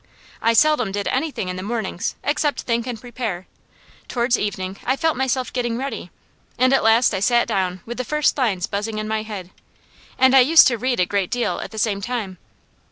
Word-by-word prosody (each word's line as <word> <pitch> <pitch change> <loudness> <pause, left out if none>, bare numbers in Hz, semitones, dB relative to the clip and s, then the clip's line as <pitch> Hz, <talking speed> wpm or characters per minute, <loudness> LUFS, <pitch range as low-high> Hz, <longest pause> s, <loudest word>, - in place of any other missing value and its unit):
I 230 +1 +3
seldom 245 -4 +3
did 205 +1 -3
anything 275 -7 -2
in 180 0 -4
the - - -4
mornings 215 -1 -3
except 295 0 0
think 235 0 -1
and 240 -3 -4
prepare; 225 -6 -5 0.6
towards 240 0 +1
evening 190 -3 -3
I 260 - +1
felt 320 +2 0
myself 260 -1 -1
getting 240 -2 -1
ready, 270 +2 -5 0.5
and 255 +1 +3
at 270 - +3
last 225 +2 +4
I - - -1
sat 240 +4 +2
down 185 -4 -1
with 240 +2 -7
the - - 0
first 300 +3 +1
lines 210 -10 0
buzzing 210 +2 -3
in 215 0 -3
my 220 0 -1
head. 200 -4 -7 0.7
And 260 0 +5
I - - +9
used 310 +6 +7
to 240 - -1
read 250 -1 0
a 180 - +4
great 195 -1 -1
deal 245 -1 -1
at - - -6
the 220 - -11
same 205 -2 0
time. 210 -5 -4
230 Hz, 205 wpm, -21 LUFS, 200-255 Hz, 0.7 s, I